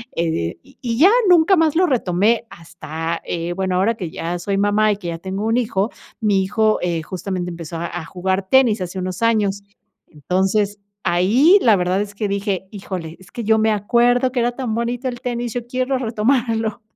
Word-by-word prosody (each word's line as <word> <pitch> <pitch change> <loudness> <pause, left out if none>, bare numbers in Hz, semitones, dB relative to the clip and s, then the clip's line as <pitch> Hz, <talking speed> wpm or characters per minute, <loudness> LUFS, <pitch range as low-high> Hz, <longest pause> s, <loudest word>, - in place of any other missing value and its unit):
eh, 85 - -1
y - - -22
y 235 -2 -2
ya, 360 - +6 0.2
nunca 355 +2 +6
más 320 -2 +2
lo 360 +2 +4
retomé. 230 - +1
Hasta, 165 0 -6
eh, 170 +1 -3
bueno, 190 -1 -1
ahora 205 +5 +2
que 180 -6 -5
ya 170 +2 -4
soy 195 +2 -2
mamá 205 +1 +3
y 205 - -1
que 185 -4 -8
ya 165 -1 -3
tengo 195 +3 -4
un 225 +2 +1
hijo, 215 -3 0 0.3
mi 200 -4 +2
hijo, 215 +2 +1
eh, 170 -2 -1
justamente 185 0 -4
empezó 165 -1 -7
a 170 - -3
a 160 - -8
jugar 190 +2 -2
tenis, 240 -6 +4
hace 180 +1 -5
unos 185 +2 -4
años. 210 -3 +1 0.5
Entonces, 190 +7 -1 0.2
ahí, 225 - +4
la 225 -3 +5
verdad 185 +1 0
es 205 0 -6
que 210 0 -2
dije: 200 -2 -2
"Híjole, 180 -5 -6
es 185 - -17
que 235 - -5
yo 220 +1 +3
me 220 0 +3
acuerdo 240 +4 +2
que 250 - -1
era 240 +1 +1
tan 245 -3 -3
bonito 240 +2 -2
el 245 -1 -5
tenis, 240 -2 -3
yo 245 -1 -4
quiero 255 +2 -1
retomarlo". 225 -2 0
205 Hz, 200 wpm, -20 LUFS, 180-235 Hz, 0.5 s, ya